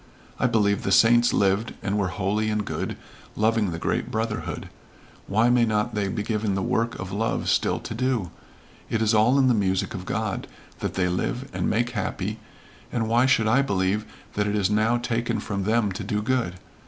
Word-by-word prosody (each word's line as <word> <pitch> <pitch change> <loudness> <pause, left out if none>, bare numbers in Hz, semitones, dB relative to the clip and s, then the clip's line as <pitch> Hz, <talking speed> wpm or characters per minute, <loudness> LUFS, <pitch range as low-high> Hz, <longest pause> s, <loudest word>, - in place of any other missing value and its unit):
I - - +3
believe 105 -4 +2
the 95 - -2
saints 120 +4 +5
lived 100 +3 +1
and 100 0 -1
were 100 -3 +1
holy 100 +4 -1
and 105 -1 -1
good, - - -4 0.4
loving 110 -1 +2
the 85 - -4
great - - -1
brotherhood. 110 0 -3 0.6
Why 110 +4 +3
may 120 -1 +4
not 110 +1 0
they 105 -2 0
be 105 +2 -2
given 105 -2 -1
the 95 - -1
work 115 +4 0
of 95 -1 -6
love 110 +3 -1
still - - +2
to - - -6
do? 120 -6 -1 0.6
It 115 - 0
is 110 0 +2
all 110 +5 +4
in 135 -1 +4
the 125 - +4
music 95 -3 0
of - - -6
God, - - -2 0.3
that - - -3
they 90 -1 +1
live, 120 +9 -2
and - - -1
make 120 +3 +1
happy, 110 -3 -3 0.5
and 115 -2 -1
why 120 +3 +3
should 115 -4 +3
I 125 +5 +4
believe 100 -3 0 0.3
that 105 0 0
it 105 - 0
is 100 -1 +1
now 110 +3 +3
taken 120 -1 -1
from 100 -2 -3
them 110 -1 +2
to 95 +3 -5
do 105 +1 -2
good? 115 -7 0
110 Hz, 200 wpm, -25 LUFS, 100-115 Hz, 0.6 s, saints